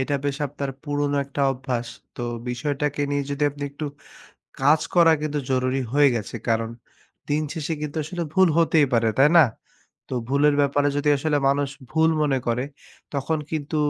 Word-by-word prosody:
এটা 140 Hz, +2 st, -1 dB
বেশ 140 Hz, -1 st, -1 dB
আপনার 140 Hz, 0 st, -5 dB
পুরনো 145 Hz, -1 st, -1 dB
একটা 140 Hz, +1 st, -3 dB
অভ্যাস। 125 Hz, -2 st, -3 dB, 0.3 s
তো -, -, -5 dB, 0.3 s
বিষয়টাকে 145 Hz, +3 st, -2 dB
নিয়ে 145 Hz, 0 st, 0 dB
যদি 140 Hz, +1 st, -3 dB
আপনি 145 Hz, 0 st, -10 dB
একটু 145 Hz, +2 st, -6 dB, 0.8 s
কাজ 150 Hz, +3 st, +5 dB
করা 170 Hz, -2 st, +7 dB
কিন্তু 150 Hz, -1 st, -1 dB
জরুরি 130 Hz, +1 st, +1 dB
হয়ে 145 Hz, -1 st, +6 dB
গেছে। 110 Hz, -, -4 dB
কারণ 115 Hz, 0 st, +1 dB, 0.6 s
দিনশেষে 155 Hz, +2 st, -1 dB
কিন্তু 150 Hz, +1 st, -4 dB
আসলে 170 Hz, +3 st, -4 dB
ভুল 190 Hz, 0 st, +5 dB
হতেই 160 Hz, -3 st, +4 dB
পারে, 115 Hz, -1 st, +3 dB
তাই 140 Hz, +3 st, +6 dB
না? 165 Hz, -, +9 dB, 0.7 s
তো -, -, -4 dB
ভুলের 145 Hz, +2 st, +3 dB
ব্যাপারে 145 Hz, +1 st, +2 dB
যদি 150 Hz, +1 st, +1 dB
আসলে 150 Hz, +1 st, +1 dB
মানুষ 140 Hz, 0 st, +1 dB, 0.2 s
ভুল 160 Hz, 0 st, +3 dB
মনে 135 Hz, -3 st, +2 dB
করে 120 Hz, +2 st, 0 dB, 0.5 s
তখন 140 Hz, +3 st, -1 dB
কিন্তু 155 Hz, 0 st, -3 dB
145 Hz, 165 wpm, -24 LUFS, 135-150 Hz, 0.8 s, না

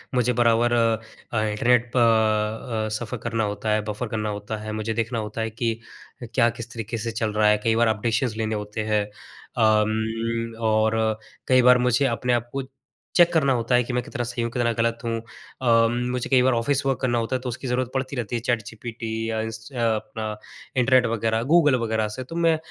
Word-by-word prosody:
मुझे 125 Hz, 0 st, +2 dB
बराबर 120 Hz, 0 st, +3 dB
अ, 115 Hz, -1 st, -1 dB
इंटरनेट 120 Hz, +3 st, +2 dB
प 110 Hz, -1 st, +2 dB
अ, -, -, -4 dB
सफर 115 Hz, -2 st, -5 dB
करना 115 Hz, -1 st, -1 dB
होता 105 Hz, +1 st, -3 dB
है, 110 Hz, -, +2 dB
बफर 105 Hz, +3 st, -3 dB
करना 110 Hz, -1 st, -2 dB
होता 105 Hz, +1 st, -4 dB
है, 110 Hz, -, -5 dB
मुझे 110 Hz, +1 st, -2 dB
देखना 115 Hz, +1 st, -1 dB
होता 110 Hz, +1 st, -4 dB
है 110 Hz, -, -1 dB
कि 115 Hz, +1 st, -1 dB, 0.5 s
अ, -, -, -4 dB
क्या 120 Hz, -2 st, +4 dB
किस 115 Hz, 0 st, -8 dB
तरीके 115 Hz, 0 st, -4 dB
से 115 Hz, +1 st, -3 dB
चल 110 Hz, -1 st, -2 dB
रहा 105 Hz, 0 st, +3 dB
है, 105 Hz, -, +5 dB
कई 115 Hz, -1 st, +2 dB
बार 115 Hz, 0 st, +3 dB
अपडेशंस 110 Hz, +2 st, 0 dB
लेने 110 Hz, -1 st, -1 dB
होते 105 Hz, +1 st, -4 dB
हैं। 105 Hz, -1 st, +2 dB, 0.5 s
अम, 110 Hz, +1 st, +1 dB
और 110 Hz, 0 st, +2 dB, 0.5 s
कई 130 Hz, -1 st, +5 dB
बार 125 Hz, 0 st, +7 dB
मुझे 125 Hz, +3 st, +3 dB
अपने 125 Hz, 0 st, 0 dB
आप 120 Hz, 0 st, -1 dB
को 135 Hz, 0 st, -2 dB, 0.5 s
चेक 175 Hz, -1 st, +6 dB
करना 140 Hz, -5 st, +3 dB
होता 120 Hz, 0 st, +1 dB
है 125 Hz, -, +4 dB
कि 120 Hz, +1 st, -5 dB
मैं 125 Hz, -, +1 dB
कितना 120 Hz, -, -4 dB
सही 120 Hz, 0 st, -3 dB
हूँ, 115 Hz, -, -2 dB
कितना 120 Hz, -1 st, +1 dB
गलत 115 Hz, +1 st, 0 dB
हूँ 115 Hz, 0 st, -1 dB, 0.4 s
अम, 115 Hz, -1 st, +4 dB, 0.2 s
मुझे 125 Hz, -1 st, -3 dB
कई 130 Hz, -2 st, +5 dB
बार 130 Hz, 0 st, +3 dB
ऑफिस 135 Hz, +4 st, 0 dB
वर्क 135 Hz, -1 st, +1 dB
करना 120 Hz, -2 st, +1 dB
होता 115 Hz, +3 st, -1 dB
है, -, -, 0 dB
तो 130 Hz, -, -4 dB
उसकी 130 Hz, +2 st, -5 dB
ज़रूरत 125 Hz, 0 st, 0 dB
पड़ती 130 Hz, +1 st, -2 dB
रहती 120 Hz, -2 st, -3 dB
है 115 Hz, -, -2 dB
चैट 120 Hz, -1 st, 0 dB
जीपीटी 115 Hz, +1 st, -7 dB, 0.2 s
या 110 Hz, 0 st, -1 dB
इस 110 Hz, +1 st, -6 dB
अ, 130 Hz, -, -9 dB, 0.2 s
अपना 110 Hz, -2 st, -5 dB, 0.4 s
इंटरनेट 130 Hz, 0 st, +4 dB
वगैरह 115 Hz, 0 st, 0 dB
गूगल 155 Hz, -5 st, +5 dB
वगैरह 110 Hz, -1 st, 0 dB
से, 105 Hz, +5 st, -6 dB
तो 165 Hz, +6 st, -9 dB
मैं 165 Hz, -1 st, +3 dB
115 Hz, 215 wpm, -24 LUFS, 110-125 Hz, 0.5 s, बार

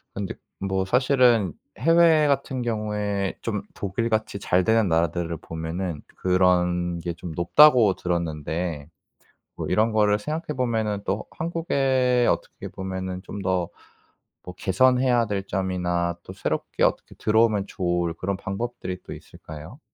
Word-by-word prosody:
근데 100 Hz, -1 st, -3 dB, 0.3 s
뭐 95 Hz, 0 st, -1 dB
사실은 125 Hz, -, +3 dB, 0.3 s
해외 165 Hz, +2 st, +5 dB
같은 135 Hz, -2 st, 0 dB
경우에 105 Hz, -3 st, -2 dB
좀 105 Hz, -3 st, -2 dB
독일같이 110 Hz, +1 st, -2 dB
잘 90 Hz, -1 st, +2 dB
되는 110 Hz, -3 st, +3 dB
나라들을 85 Hz, 0 st, 0 dB
보면은 80 Hz, 0 st, -5 dB, 0.2 s
그런 90 Hz, -1 st, +2 dB
게 85 Hz, 0 st, -4 dB
좀 85 Hz, 0 st, -7 dB
높다고 115 Hz, -, +6 dB
들었는데 80 Hz, -2 st, -3 dB, 0.7 s
뭐 -, -, -4 dB
이런 110 Hz, +5 st, +2 dB
거를 105 Hz, -1 st, +3 dB
생각해 155 Hz, +6 st, -4 dB
보면은 110 Hz, -5 st, 0 dB
또 100 Hz, +3 st, -2 dB
한국에 135 Hz, -7 st, +1 dB
어떻게 -, -, -3 dB
보면은 95 Hz, -1 st, -5 dB
좀 100 Hz, -, -7 dB
더 95 Hz, -2 st, 0 dB, 0.8 s
뭐 90 Hz, -, -8 dB
개선해야 125 Hz, +5 st, +3 dB
될 100 Hz, -2 st, -2 dB
점이나 90 Hz, -3 st, -1 dB
또 95 Hz, -, -9 dB
새롭게 95 Hz, -, -3 dB
어떻게 -, -, 0 dB
들어오면 110 Hz, -2 st, +2 dB
좋을 85 Hz, -3 st, -1 dB
그런 95 Hz, +3 st, -3 dB
방법들이 95 Hz, -2 st, -5 dB
또 -, -, -8 dB
있을까요? 80 Hz, -, -11 dB
100 Hz, 285 characters per minute, -24 LUFS, 90-115 Hz, 0.8 s, 높다고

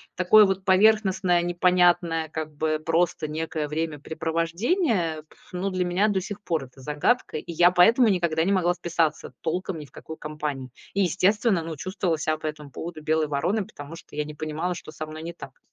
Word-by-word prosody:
такое 210 Hz, +4 st, +6 dB
вот 190 Hz, -1 st, -2 dB
поверхностное, 190 Hz, -3 st, +4 dB
непонятное, 175 Hz, -2 st, +2 dB
как 155 Hz, 0 st, -5 dB
бы 155 Hz, +1 st, 0 dB
просто 165 Hz, -1 st, +1 dB
некое 155 Hz, 0 st, -3 dB
времяпрепровождение. 165 Hz, -, -1 dB
Пф, -, -, -23 dB
но 185 Hz, +2 st, -1 dB
для 185 Hz, -1 st, -1 dB
меня 180 Hz, +4 st, +2 dB
до 190 Hz, -2 st, 0 dB
сих 205 Hz, +2 st, -7 dB
пор 165 Hz, -8 st, -2 dB
это 130 Hz, +1 st, -17 dB
загадка, 150 Hz, -, 0 dB
и 150 Hz, -, -7 dB
я 175 Hz, +2 st, +5 dB
поэтому 225 Hz, +8 st, +5 dB
никогда 170 Hz, -4 st, +1 dB
не 190 Hz, -, +1 dB
могла 180 Hz, -2 st, +2 dB
вписаться 170 Hz, -2 st, -1 dB
толком 180 Hz, +2 st, -2 dB
ни 150 Hz, -, -8 dB
в 135 Hz, -, -21 dB
какую 160 Hz, -, -10 dB
компанию. 150 Hz, -4 st, -5 dB, 0.2 s
И 200 Hz, -, +1 dB
естественно, 195 Hz, +1 st, +2 dB
ну, 160 Hz, 0 st, -5 dB
чувствовала 185 Hz, 0 st, -2 dB
ся 155 Hz, 0 st, -1 dB
по 155 Hz, -, -5 dB
этому 150 Hz, -2 st, -7 dB
поводу 160 Hz, +1 st, -7 dB
белой 155 Hz, 0 st, +1 dB
вороной, 175 Hz, +9 st, 0 dB
потому 145 Hz, 0 st, -10 dB
что 170 Hz, -, -14 dB
я 150 Hz, -, 0 dB
не 150 Hz, -, -8 dB
понимала, 155 Hz, +4 st, -3 dB
что 155 Hz, -, -9 dB
со 155 Hz, 0 st, -6 dB
мной 155 Hz, 0 st, -9 dB
не 170 Hz, +1 st, -6 dB
так. 135 Hz, -5 st, -11 dB
165 Hz, 190 wpm, -25 LUFS, 155-185 Hz, 0.2 s, такое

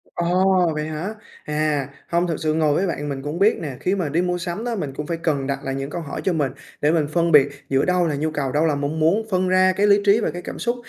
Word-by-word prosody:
Ồ, 180 Hz, 0 st, +2 dB
vậy 150 Hz, 0 st, -2 dB
hả? 155 Hz, +7 st, -4 dB, 0.3 s
À, 150 Hz, -2 st, -1 dB, 0.2 s
hông, 170 Hz, +1 st, +1 dB
thực 165 Hz, -3 st, -2 dB
sự 155 Hz, -1 st, 0 dB
ngồi 155 Hz, -2 st, +2 dB
với 190 Hz, +5 st, +1 dB
bạn 145 Hz, -3 st, -3 dB
mình 135 Hz, -1 st, -4 dB
cũng 150 Hz, +4 st, -4 dB
biết 210 Hz, +3 st, +4 dB
nè, 140 Hz, -5 st, -5 dB
khi 190 Hz, +2 st, 0 dB
mà 170 Hz, -7 st, -2 dB
đi 165 Hz, +5 st, +1 dB
mua 180 Hz, 0 st, 0 dB
sắm 175 Hz, +5 st, -4 dB
đó 240 Hz, -1 st, -2 dB
mình 150 Hz, -10 st, -4 dB
cũng 150 Hz, +2 st, -5 dB
phải 170 Hz, -, -2 dB
cần 150 Hz, -5 st, -1 dB
đặt 140 Hz, -1 st, -2 dB
lại 135 Hz, 0 st, -3 dB
những 135 Hz, +1 st, -4 dB
câu 170 Hz, -, -4 dB
hỏi 150 Hz, -, -6 dB
cho 185 Hz, -, +1 dB
mình, 145 Hz, -5 st, 0 dB, 0.3 s
để 150 Hz, -, +3 dB
mình 160 Hz, -3 st, +1 dB
phân 170 Hz, +2 st, +1 dB
biệt 145 Hz, -2 st, +6 dB, 0.2 s
giữa 135 Hz, 0 st, +2 dB
đâu 180 Hz, -1 st, +2 dB
là 150 Hz, -, -1 dB
nhu 155 Hz, +2 st, -1 dB
cầu, 145 Hz, -3 st, -2 dB
đâu 150 Hz, +4 st, +2 dB
là 155 Hz, -3 st, +2 dB
mong 145 Hz, +3 st, -2 dB
muốn. 190 Hz, +8 st, +2 dB
Phân 185 Hz, 0 st, +1 dB
ra 185 Hz, 0 st, +4 dB
cái 205 Hz, +1 st, +3 dB
lý 200 Hz, 0 st, +5 dB
trí 205 Hz, +2 st, +5 dB
và 220 Hz, -, -1 dB
cái 175 Hz, -, -6 dB
cảm -, -, -7 dB
xúc, 240 Hz, 0 st, 0 dB
160 Hz, 290 wpm, -22 LUFS, 145-180 Hz, 0.3 s, biệt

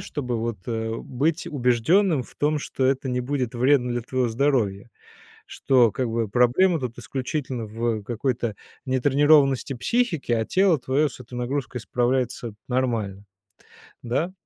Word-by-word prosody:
чтобы 125 Hz, -5 st, -3 dB
вот, 115 Hz, 0 st, -2 dB
э, 115 Hz, -1 st, -2 dB
быть 150 Hz, +9 st, -1 dB
убежденным 145 Hz, -, +2 dB
в -, -, -16 dB
том, 150 Hz, +1 st, +1 dB
что 135 Hz, -2 st, -3 dB
это 135 Hz, 0 st, 0 dB
не 125 Hz, 0 st, 0 dB
будет 125 Hz, -2 st, -2 dB
вредно 125 Hz, +1 st, +3 dB
для 120 Hz, -, -1 dB
твоего 125 Hz, +1 st, -1 dB
здоровья. 115 Hz, -4 st, 0 dB, 0.6 s
Что 125 Hz, -5 st, +3 dB
как 130 Hz, -2 st, -2 dB
бы 115 Hz, -1 st, -1 dB
проблема 125 Hz, -, +3 dB
тут 125 Hz, -3 st, -5 dB
исключительно 130 Hz, -1 st, -4 dB
в 110 Hz, 0 st, -2 dB
какой-то 120 Hz, -1 st, -2 dB, 0.3 s
нетренированности 135 Hz, +1 st, +3 dB
психики, 165 Hz, -, 0 dB
а 115 Hz, -1 st, +1 dB
тело 185 Hz, -4 st, +3 dB
твое 135 Hz, +4 st, +1 dB
с -, -, -13 dB
этой 125 Hz, 0 st, -11 dB
нагрузкой 125 Hz, 0 st, -3 dB
справляется 120 Hz, -2 st, -1 dB
нормально. 115 Hz, -6 st, -1 dB, 0.8 s
Да? 140 Hz, +10 st, -1 dB
125 Hz, 140 wpm, -24 LUFS, 120-140 Hz, 0.8 s, вредно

